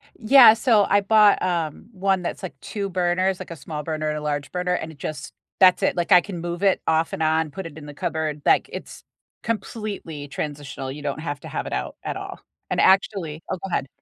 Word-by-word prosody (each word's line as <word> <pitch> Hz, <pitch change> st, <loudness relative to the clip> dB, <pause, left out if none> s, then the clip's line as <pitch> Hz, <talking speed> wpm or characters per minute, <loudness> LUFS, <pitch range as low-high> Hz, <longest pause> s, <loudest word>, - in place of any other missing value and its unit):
Yeah, 235 Hz, 0 st, +8 dB
so 225 Hz, -2 st, +3 dB
I 205 Hz, +1 st, +4 dB
bought, 210 Hz, 0 st, +5 dB
um, 170 Hz, +2 st, -2 dB
one 195 Hz, -2 st, 0 dB
that's, 180 Hz, -, -5 dB
like, 140 Hz, -8 st, -7 dB
2 200 Hz, -3 st, -4 dB
burners, 185 Hz, +1 st, 0 dB
like, 185 Hz, -, -8 dB
a -, -, -5 dB
small 150 Hz, 0 st, -6 dB
burner 155 Hz, -1 st, -3 dB
and 150 Hz, -, -2 dB
a -, -, -5 dB
large 145 Hz, -1 st, -3 dB
burner, 180 Hz, 0 st, -1 dB
and 160 Hz, -2 st, -3 dB
it 155 Hz, -, -16 dB
just 140 Hz, -1 st, -6 dB, 0.3 s
that's 185 Hz, -1 st, +6 dB
it, -, -, +1 dB
like, 175 Hz, +2 st, -1 dB
I 180 Hz, -2 st, +8 dB
can 185 Hz, -3 st, -7 dB
move 175 Hz, +1 st, -4 dB
it 195 Hz, -1 st, +3 dB
off 160 Hz, 0 st, +1 dB
and 160 Hz, -, -2 dB
on, 160 Hz, 0 st, +1 dB
put 190 Hz, +6 st, -7 dB
it 160 Hz, -2 st, -9 dB
in 150 Hz, -, -11 dB
the 145 Hz, -, -8 dB
cupboard, 155 Hz, 0 st, -3 dB
like, -, -, +3 dB
it's -, -, -9 dB, 0.4 s
completely 210 Hz, -10 st, -4 dB
transitional, 140 Hz, -2 st, -5 dB
you 145 Hz, +2 st, -8 dB
don't 145 Hz, +1 st, -3 dB
have 145 Hz, -3 st, -4 dB
to -, -, -9 dB
have -, -, -4 dB
it -, -, -5 dB
out 65 Hz, -1 st, -3 dB
at -, -, -3 dB
all, -, -, -7 dB, 0.3 s
and -, -, -1 dB
actually 190 Hz, -5 st, +2 dB
Oh, 190 Hz, -, -1 dB
go 195 Hz, -, -4 dB
ahead. 135 Hz, -, -1 dB
170 Hz, 230 wpm, -23 LUFS, 150-195 Hz, 0.4 s, Yeah